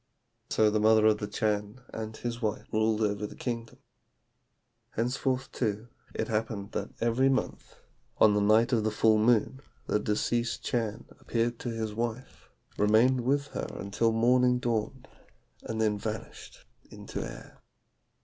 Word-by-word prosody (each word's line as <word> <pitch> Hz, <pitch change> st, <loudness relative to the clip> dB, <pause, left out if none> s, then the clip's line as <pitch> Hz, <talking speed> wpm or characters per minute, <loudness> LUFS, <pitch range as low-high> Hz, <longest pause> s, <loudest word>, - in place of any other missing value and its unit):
So 110 Hz, -1 st, +3 dB
the 110 Hz, -, +1 dB
mother 110 Hz, 0 st, +5 dB
of 110 Hz, -1 st, +4 dB
the 105 Hz, -, -3 dB
Chan 105 Hz, +2 st, -1 dB
and 110 Hz, 0 st, -5 dB
his 120 Hz, 0 st, -4 dB
wife 110 Hz, -2 st, -2 dB
ruled 110 Hz, 0 st, +2 dB
over 105 Hz, -1 st, 0 dB
the -, -, -12 dB
kingdom. 115 Hz, -2 st, -5 dB, 1.2 s
"Henceforth, 130 Hz, +2 st, -1 dB
too, 110 Hz, 0 st, -2 dB, 0.3 s
it -, -, -1 dB
happened 110 Hz, -2 st, -2 dB
that -, -, -3 dB
every 120 Hz, +3 st, +2 dB
month, 130 Hz, -1 st, -2 dB, 0.4 s
on 105 Hz, -, +6 dB
the 105 Hz, -, +2 dB
night 110 Hz, +4 st, +4 dB
of 110 Hz, -3 st, +2 dB
the 110 Hz, -, +2 dB
full 110 Hz, 0 st, +3 dB
moon, 120 Hz, +4 st, +2 dB, 0.2 s
the 105 Hz, -, +1 dB
deceased 115 Hz, +3 st, -1 dB
Chan 115 Hz, -1 st, -2 dB
appeared 120 Hz, 0 st, -1 dB
to 120 Hz, -, -4 dB
his 110 Hz, -2 st, -3 dB
wife, 120 Hz, +3 st, -5 dB, 0.3 s
remained 115 Hz, +5 st, +4 dB
with 140 Hz, +3 st, 0 dB
her -, -, -4 dB
until 100 Hz, +4 st, 0 dB
morning 125 Hz, +2 st, +3 dB
dawned, 120 Hz, +2 st, -2 dB, 0.5 s
and 110 Hz, 0 st, -5 dB
then 105 Hz, -2 st, +1 dB
vanished 110 Hz, +1 st, -7 dB, 0.2 s
into -, -, -6 dB
air. -, -, -9 dB
110 Hz, 150 wpm, -29 LUFS, 105-120 Hz, 1.2 s, on